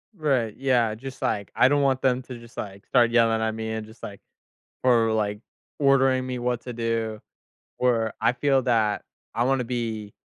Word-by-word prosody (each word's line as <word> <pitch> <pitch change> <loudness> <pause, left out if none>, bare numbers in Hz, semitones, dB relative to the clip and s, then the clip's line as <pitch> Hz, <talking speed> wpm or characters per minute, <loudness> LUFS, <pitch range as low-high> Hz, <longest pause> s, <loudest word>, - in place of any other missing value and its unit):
Right, 130 - 0
yeah, 125 -5 +2
just, 130 +4 -9
like, 100 -1 -1
I 125 - +6
don't 145 +1 +2
want 135 -1 +2
them 130 -1 +2
to 125 -1 -8
just, 115 0 -15
like, 100 -1 -7
start 120 -2 +4
yelling 115 -1 +3
at 110 0 -1
me 110 0 -4
and 110 -1 -4
just, 110 +2 -17
like 100 -1 -8 0.6
or, 115 -3 +4
like, 105 -1 -1 0.4
ordering 135 -2 +3
me 130 -1 -4
what 120 -1 -1
to 125 - -7
do, 115 -2 -2 0.6
or 115 -3 +1
I 115 +2 +4
feel 135 0 +2
that 110 -4 +1 0.3
I 120 - +1
wanna 135 0 +1
be 115 -4 -4
120 Hz, 185 wpm, -25 LUFS, 110-130 Hz, 0.6 s, I